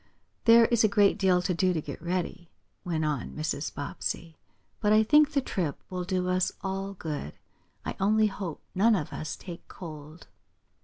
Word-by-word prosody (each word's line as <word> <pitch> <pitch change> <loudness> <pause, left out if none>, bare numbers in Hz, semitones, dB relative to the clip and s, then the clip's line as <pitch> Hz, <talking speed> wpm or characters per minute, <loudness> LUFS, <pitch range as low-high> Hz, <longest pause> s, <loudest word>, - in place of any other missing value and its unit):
"There 230 0 +8
is 230 -1 +3
a - - +6
great 205 0 +3
deal 185 -2 +3
to 180 - 0
do 180 +2 +2
to 165 - -1
get 145 -1 -7
ready," 175 0 -3 0.3
went 165 -4 -1
on 150 -5 -2
Mrs. 155 -1 -2
Bobbsey. 160 +3 -4 0.4
"But 210 -1 +2
I 215 +1 +6
think 300 +6 +5
the 280 - +3
trip 175 - -2
will 180 -1 -3
do 185 -1 -1
us 185 0 +1
all 195 +1 -3
good. 150 - -5 0.5
I - - -3
only 215 +3 +4
hope 190 -6 -4
none 215 +4 +4
of 155 -7 -3
us 155 - -4
take 175 -3 -10
cold." 155 -2 -10
185 Hz, 175 wpm, -28 LUFS, 160-205 Hz, 0.5 s, There